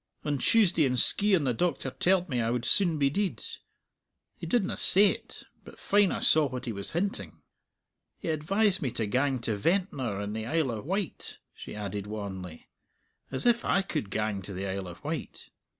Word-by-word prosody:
On 145 -2 -1
Tuesday 190 - +3
in 130 -3 +2
Skeighan 195 +3 +3
the 130 -3 +1
doctor 175 +8 -1
telled 185 0 +1
me 125 -6 -1
I 115 - 0
would 120 0 -1
soon 175 -6 +4
be 140 -2 +2
deid; 200 +3 -2 0.9
he - - -8
didna 235 -6 +1
say't, 200 +2 +2 0.2
but - - -13
fine 205 -2 +3
I - - -1
saw 155 -2 +4
what 125 -1 -6
he 120 - -3
was 100 -2 -5
hinting. 195 +5 -3 0.7
He - - -5
advised 190 +6 +1
me 135 - 0
to 115 -3 -1
gang 130 +5 +1
to 115 -2 -1
Ventnor 135 - -1
in 105 0 -4
the 110 0 -4
Isle 155 -3 0
o' 110 -2 -4
Wight," 190 - -4 0.2
she - - -9
added 105 -1 -5
wanly; 95 -5 -7 0.6
"as 130 - -3
if 240 -1 +3
I 195 - +2
could 105 - -4
gang 105 -1 -2
to 100 - -8
the 95 +1 -4
Isle 95 -1 -4
of 90 - -11
Wight. - - -6
135 Hz, 185 wpm, -28 LUFS, -, 0.9 s, soon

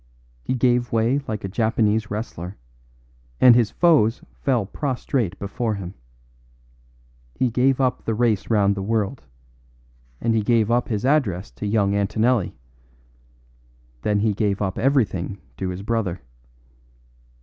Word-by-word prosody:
He 130 - -2
gave 120 -1 +2
way 115 +5 +2
like 110 -2 -4
a - - -2
Japanese 110 +1 +1
wrestler, 100 -4 -5 0.8
and 125 - +8
his 115 -3 +3
foes 145 -10 +3
fell 125 -7 0
prostrate 125 - -2
before 110 +3 -2
him. 95 -2 -7 1.4
He 125 -2 0
gave 130 +3 +2
up 130 -2 0
the 115 - 0
race 110 -4 +1
round 100 -3 +3
the 100 - -4
world, 110 +4 -1 1.0
and 115 0 +1
he 110 - +2
gave 115 0 +2
up 120 +1 +2
his 105 0 -2
address 115 - +1
to 105 - -5
young 100 -2 +2
Antonelli; 110 +2 +1 1.5
then 105 +4 +1
he 110 -1 +2
gave 100 -1 0
up 95 -2 -2
everything 110 -9 +1 0.2
to 95 - -3
his 90 +2 -5
brother. 105 -5 -1
110 Hz, 135 wpm, -23 LUFS, 100-120 Hz, 1.5 s, and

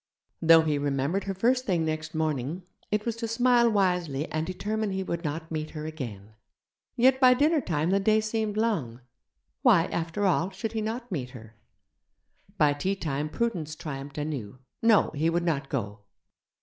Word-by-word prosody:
Though 165 0 +7
he 150 -2 0
remembered 145 +7 -1
her 195 - -2
first 250 +6 +2
thing 170 -5 +1
next 155 0 -3
morning, 155 +2 -2 0.3
it 210 +1 -1
was 230 -2 -1
to 230 0 -3
smile 240 +1 +4
wisely 180 -8 +1
and 155 +1 -2
determine 210 +3 -2
he 190 0 -2
would 170 -2 -4
not 160 +1 -4
meet 155 -1 -3
her 150 - -5
again. 115 -10 -7 0.6
Yet 260 +2 +4
by 255 -1 +7
dinner 300 +3 +3
time 165 - -1
the 195 - +3
day 215 +2 +3
seemed 215 -1 -2
long; 160 - -1 0.6
why, 215 - +5
after 170 +4 -2
all, 180 -1 +2
should 225 +2 -5
he 225 -1 -2
not 230 +2 -4
meet 130 -8 -3
her? 110 -1 -14 1.0
By 150 -4 +4
tea 185 +7 -1
time 150 -4 -3
prudence 170 -8 -2
triumphed 140 -3 -7
anew 140 -7 -4 0.2
no, 225 -2 +4
he 155 +2 0
would 170 +1 0
not 140 -5 -1
go. 105 -5 -3
170 Hz, 175 wpm, -27 LUFS, 150-215 Hz, 1.0 s, Though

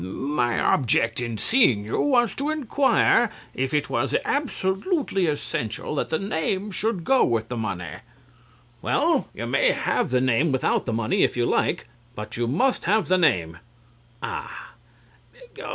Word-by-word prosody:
My 120 +5 -1
object 115 -3 +1
in 115 -2 -4
seeing 130 - +3
you 110 - -1
was 245 -5 +2
to 285 +2 -3
inquire 275 -4 +2 0.2
if 130 0 -2
it 150 -1 0
was 120 +3 -1
absolutely 265 - -1
essential 120 -5 -3
that 145 - -2
the 160 - 0
name 195 +2 -2
should 200 -2 -2
go 265 +8 +3
with 115 -1 0
the 125 - -4
money. 110 -6 -3
CLIFTON. - - -9 0.8
Well - - 0 0.3
(thoughtfully), - - -30
you - - -2
may - - +2
have - - -1
the 125 0 +2
name 130 +5 +2
without 130 0 0
the 115 - -1
money 110 -1 0
if - - +2
you 120 - +1
like. - - 0 0.3
But 105 0 -7
you 120 0 -1
must 220 - +1
have 210 +3 +1
the 185 0 +3
name. 85 - +1 0.6
CRAWSHAW - - -5 0.9
(disappointed). - - -14
Ah! - - -7
150 Hz, 170 wpm, -24 LUFS, -, 0.9 s, seeing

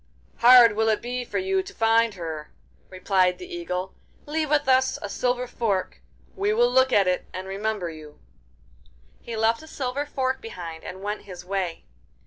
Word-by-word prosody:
'Hard 240 -2 +8
will 220 +1 +2
it 215 - +2
be 245 +1 -4
for - - -4
you 380 0 +1
to 390 +1 -12
find 225 -1 +3
her,' 160 -4 -6 0.4
replied 185 -1 +1
the 365 - -9
Eagle. 335 - -4 0.3
'Leave 310 0 -2
with 295 -2 +2
us 260 0 +3
a - - -5
silver 250 +4 -1
fork. 220 -6 -2 0.3
We 405 +1 +1
will 485 +2 +3
look 260 0 +4
at 195 -2 +4
it 180 0 0
and 185 +1 -5
remember 200 -1 -2
you.' 155 -2 -12 1.0
He 230 - -6
left 225 +3 +2
a 315 - -13
silver 280 0 -3
fork 260 -2 -2
behind, 170 -7 -8
and 190 +1 -8
went 210 0 -4
his 180 -2 -10
way. 185 -3 -3
225 Hz, 175 wpm, -25 LUFS, 185-260 Hz, 1.0 s, Hard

